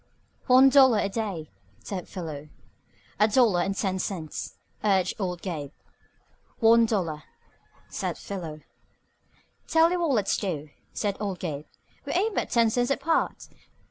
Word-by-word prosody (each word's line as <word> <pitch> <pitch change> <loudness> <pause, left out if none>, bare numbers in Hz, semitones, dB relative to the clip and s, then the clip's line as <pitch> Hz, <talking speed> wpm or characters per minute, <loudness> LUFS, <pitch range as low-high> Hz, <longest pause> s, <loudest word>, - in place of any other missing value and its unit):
"One 260 +2 +7
dollar 265 -4 +6
a 200 - 0
day," 195 -8 -4 0.3
said 185 -4 -5
Philo. 155 -5 -7 0.7
"A 210 - +5
dollar, 205 -6 +3
ten 195 -1 -1
cents," 170 -6 -5 0.3
urged 190 -3 +2
old 180 -2 -3
Gabe. 150 -7 -4 0.9
"One 230 0 +5
dollar," 170 -9 -1 0.7
said - - -4
Philo. 165 -6 -7 1.1
"Tell 325 +1 +4
you 360 - 0
what 335 -2 +1
let's 215 -8 +1
do," 155 -7 -4 0.2
said 205 -2 -2
old 200 -3 -3
Gabe. 155 -5 -5 0.4
"We - - -3
ain't 410 +5 +1
but - - -1
ten 230 -2 +3
cents 245 +1 +1
apart. 320 +4 0
200 Hz, 135 wpm, -26 LUFS, 175-235 Hz, 1.1 s, One